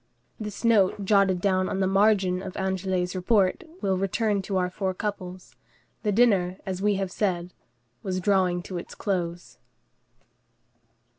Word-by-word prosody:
This 210 0 -6
note 205 -3 +3
jotted 195 -2 +3
down 185 -1 +1
on 190 - -2
the 190 - +2
margin 195 -2 +3
of 190 -1 -7
Anglès' 190 -1 -1
report, 190 - +2 0.2
we 195 - 0
will 185 - +1
return 200 +1 0
to 190 0 -2
our 180 0 0
four 190 -1 -2
couples. 185 -3 -6 0.5
The 210 - 0
dinner, 195 -5 +3
as 190 -1 -4
we 205 0 +2
have 195 -1 -2
said, 180 -4 -1 0.5
was 185 -1 -2
drawing 185 -2 +1
to 180 -1 -5
its - - -10
close. 175 -3 -3
190 Hz, 150 wpm, -26 LUFS, 185-200 Hz, 0.5 s, note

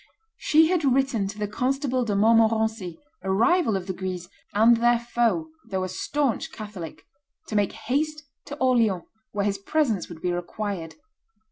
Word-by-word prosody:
She 315 +1 +4
had 355 -3 +1
written 265 -6 +2
to 205 +2 -7
the 210 -1 -2
Constable 255 +3 0
de 210 -4 -1
Montmorency, 220 -4 +2 0.2
a 190 - -4
rival 230 - +3
of 185 - -6
the 190 - -3
Guises 180 -1 -5 0.2
and 230 +3 +5
their 240 +1 +4
foe 240 +6 0 0.2
though 190 -2 -1
a 185 - -3
stanch 270 +7 -1
Catholic, 205 -7 -8 0.4
to 215 - -3
make 205 -1 +2
haste 295 +7 -2 0.2
to 285 - -7
Orleans, 230 - +2 0.3
where 200 -1 -1
his 200 -1 0
presence 230 - 0
would 170 -2 -9
be 180 - +1
required. 175 -1 -4
220 Hz, 160 wpm, -25 LUFS, 195-255 Hz, 0.4 s, and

